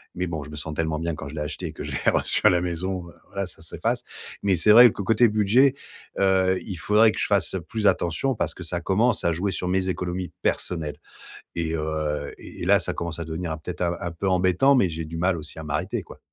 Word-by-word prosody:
mais 90 +1 -2
bon, 80 -4 -4
je 75 - -11
me 75 - -8
sens 75 +1 -5
tellement 80 0 -1
bien 85 0 -2
quand 70 - -7
je 75 - -8
l'ai 75 - -3
acheté 75 0 -4
que - - -7
je - - -6
l'ai - - +1
reçu - - +2
à - - +9
la 90 -1 +2
maison. 90 +1 -3 0.2
Voilà, 100 -2 -4
ça 80 - -5
s'efface. 80 - -2 0.4
Mais 95 -2 +3
c'est 105 +5 +4
vrai 120 +2 +10
que - - -6
côté 115 +4 +4
budget, 110 +6 +4 0.5
heu, 95 -1 +3
il 95 -4 -6
faudrait 105 +5 +4
que - - -6
je - - +1
fasse 100 -1 +2
plus 110 -1 -3
attention 85 +11 +1
parce - - -2
que 90 - -9
ça 85 +1 -2
commence 105 +7 +1
à 85 - +3
jouer 95 +4 -1
sur 90 0 -2
mes 95 0 0
économies 90 -1 -3
personnelles 80 -4 -1 0.6
et 80 -1 -2
heu, 75 -2 -2
et - - -11
et - - -3
là, - - +5
ça - - -1
commence 85 -1 -4
à 85 - -4
devenir 80 +1 -4
un 80 - -3
peut 85 +3 -6
être - - -10
un 85 -1 0
un 85 - -4
peu 95 +4 -2
embêtant, 95 +9 +4
mais 100 -8 +3
j'ai 80 0 -5
du 80 +1 -7
mal 90 0 +1
aussi 80 +1 -8
à - - -6
m'arrêter 75 0 -2
quoi. - - -14
90 Hz, 255 wpm, -24 LUFS, 80-95 Hz, 0.6 s, vrai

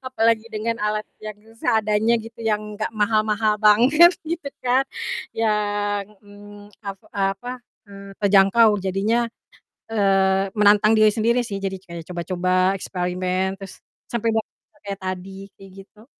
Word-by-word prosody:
apalagi 230 -2 +1
dengan 230 +1 -3
alat 210 0 -1 0.2
yang 215 -1 -7 0.2
seadanya 220 +1 +2
gitu, 230 +1 -9
yang 215 -2 0 0.2
gak - - 0
mahal-mahal 215 0 +1
banget, 255 - +6
gitu 325 -2 -4 0.2
kan, 255 +2 +3 0.5
yang, 205 -2 0 0.2
mmm, 205 0 -14
ap 195 -1 -6
apa, 200 +6 -3 0.3
eee, 200 0 -11
terjangkau 200 +3 +5
jadinya, 205 +5 0 0.6
eee, 195 -2 +2
menantang 210 +1 +5
diri 215 -1 +5
sendiri 235 +3 +1
sih, 210 -4 -5
jadi 195 -1 -3
kayak 170 -3 -9
coba-coba, 180 +1 -3 0.3
eksperimen, 185 +1 -2
terus 195 -1 -11 0.2
sampai 230 -1 -1
dapat 220 - -3 0.3
kayak 200 -1 -4
tadi, 190 +1 -6
kayak 195 0 -14
gitu. 210 +3 -21
210 Hz, 130 wpm, -22 LUFS, 195-225 Hz, 0.6 s, banget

